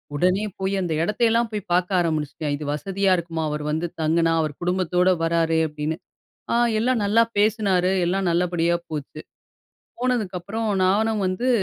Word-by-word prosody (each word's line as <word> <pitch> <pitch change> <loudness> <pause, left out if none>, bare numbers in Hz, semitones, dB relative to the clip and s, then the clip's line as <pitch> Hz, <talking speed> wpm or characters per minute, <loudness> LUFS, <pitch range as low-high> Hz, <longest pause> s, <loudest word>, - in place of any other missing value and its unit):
உடனே 185 +6 +2 0.2
போய் 190 +1 -1
அந்த 170 -3 -1
இடத்தையெல்லாம் 230 +3 +1
போய் 210 -3 -5
பாக்க 180 +1 +2
ஆரம்பிச்சுட்டேன். 155 -2 -1
"இது 150 - -7
வசதியா 195 +5 0
இருக்குமா, 165 -1 -3
அவரு 150 0 -3
வந்து 160 +3 -1
தங்குனா? 165 +1 +2
அவரு 155 -2 -2
குடும்பத்தோட 180 0 +2
வராரு." 165 -1 +2
அப்பிடின்னு. 150 +1 -4 0.6
ஆ - - +2 0.3
எல்லாம் 240 -2 +1
நல்லா 215 +3 +4 0.2
பேசினாரு, 200 -4 +2 0.2
எல்லாம் 190 0 0
நல்லபடியா 170 0 +1
போச்சு. 155 0 -6 0.8
போனதுக்கப்புறம் 220 -3 -2 0.2
நானும் 215 +2 +1
வந்து, 185 +8 -1
180 Hz, 140 wpm, -23 LUFS, 165-205 Hz, 0.8 s, நல்லா